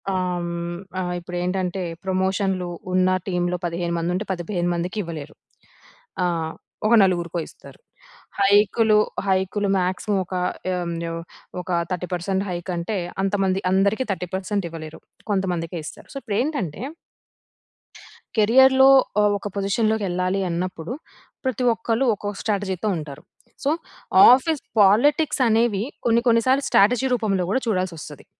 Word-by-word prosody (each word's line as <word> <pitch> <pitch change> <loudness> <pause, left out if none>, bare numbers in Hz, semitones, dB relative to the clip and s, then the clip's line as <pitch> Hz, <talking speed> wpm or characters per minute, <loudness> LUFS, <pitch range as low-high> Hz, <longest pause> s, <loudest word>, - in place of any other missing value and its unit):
ఆహ్, 180 -1 -1
హ్మ్, 170 0 -4 0.2
ఆహ్, 180 0 -2
ఇప్పుడేంటంటే 180 +1 -2 0.2
ప్రమోషన్‌లు, 190 -1 0 0.2
ఉన్న 185 0 +3 0.2
టీమ్‌లో 180 -1 0
15 170 0 -2
మందుంటే, 180 +4 -1
15 175 0 -2
మందికి 175 +4 -3
ఇవ్వలేరు. 155 -3 -7 0.9
ఆహ్, 165 -2 -1 0.3
ఒక 235 - +3
నలుగురికో 175 -2 0
ఇస్తారు. - - -15 0.6
హైక్‌లు, 210 +2 +4 0.3
హైక్‌లు 190 +2 +1
మ్యాక్సిమమ్ 190 +3 0
ఒక 185 - -8 0.4
హ్మ్, 175 -2 -2 0.2
ఓహ్! 165 0 -5 0.4
ఒక 180 - -9 0.2
30% 180 +2 -2
హైక్ 175 0 -4
అంటే 185 +5 -3 0.3
అంతమంది 195 -1 +1
అందరికి 200 +6 +2
30% 190 +1 -2
ఇవ్వలేరు. 160 -1 -9 0.3
కొంతమందికే 180 -4 -1
ఇస్తారు. - - -10
సో, - - -11
ఇప్పుడెంటంటే, 220 - -2 1.6
కెరియర్‌లో 265 +5 +6 0.3
ఆహ్, 210 0 +4
ఒక 205 - -5
పొజిషన్‌లోకెళ్ళాలి 195 -2 0
అన్నప్పుడు 175 +3 -4 0.5
ప్రతి 255 -1 -1
ఒక్కళ్ళు 230 +3 0
ఒక్కొక్క 205 0 -5
స్ట్రాటజీతో 205 -1 -1
ఉంటారు. 150 -2 -8 0.4
సో, - - +3 0.6
ఆఫీస్ 280 +4 +2 0.2
పాలిటిక్స్ 260 +8 +4
అనేవి 220 -2 +2 0.2
కొన్ని, 235 +1 +3
కొన్ని 230 0 +4
సార్లు 270 +2 +3
స్ట్రాటజీ 245 +6 +4
రూపంలో 195 -6 0
కూడా 260 - +1
చూడాల్సి 185 -5 0
వస్తది. - - -10
190 Hz, 120 wpm, -23 LUFS, 175-215 Hz, 1.6 s, కెరియర్‌లో